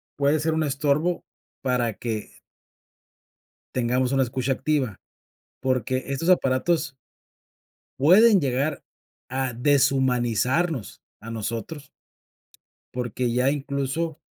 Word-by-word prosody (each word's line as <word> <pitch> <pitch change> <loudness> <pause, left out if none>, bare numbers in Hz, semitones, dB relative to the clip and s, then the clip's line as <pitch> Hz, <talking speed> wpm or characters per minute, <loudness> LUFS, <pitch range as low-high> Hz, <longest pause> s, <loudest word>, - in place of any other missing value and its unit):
puede 145 +2 +2
ser 160 +1 0
un 160 0 +1
estorbo 150 +4 0 0.4
para 125 -3 0
que 110 -3 -4 1.4
Tengamos 125 +1 +1
una 135 -1 +3
escucha 130 +2 -1
activa, 135 -6 -1 0.6
porque 130 0 0
estos 140 +6 0
aparatos 150 0 +2 1.0
Pueden 195 - +6
llegar 140 +2 -1 0.5
a 130 0 -2
deshumanizarnos 130 - +1 0.2
a 115 - -9
nosotros. 115 +6 -5 1.0
Porque 125 0 -2
ya 125 +3 +2
incluso 140 +3 -2
135 Hz, 90 wpm, -24 LUFS, 125-150 Hz, 1.4 s, Pueden